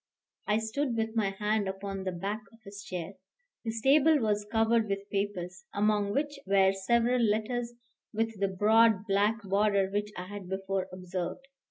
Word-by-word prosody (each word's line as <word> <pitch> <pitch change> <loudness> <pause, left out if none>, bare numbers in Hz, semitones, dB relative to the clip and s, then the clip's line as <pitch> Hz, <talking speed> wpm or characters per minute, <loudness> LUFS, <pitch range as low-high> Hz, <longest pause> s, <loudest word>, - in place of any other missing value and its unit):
I 210 - +3
stood 230 +3 -1
with 225 0 0
my 215 -3 +2
hand 210 +1 -1
upon 195 0 -5
the 185 - -1
back 200 +5 -3
of 225 - -18
his 200 +1 -9
chair. 180 0 -5 0.5
His 225 -1 -3
table 300 +3 +5
was 210 -4 0
covered 225 -1 +2
with 195 0 -3
papers, 190 -3 -3
among 205 -1 +2
which 290 +4 -1
were 195 -1 +4
several 235 +5 +2
letters 230 +2 0 0.4
with 225 -1 -2
the 200 - +2
broad 215 +2 +4
black 210 +2 +1
border 200 0 +2
which 205 +1 -2
I 180 - -5
had 195 -1 -8
before 190 0 -2
observed. 185 +6 -5
205 Hz, 165 wpm, -30 LUFS, 195-225 Hz, 0.5 s, table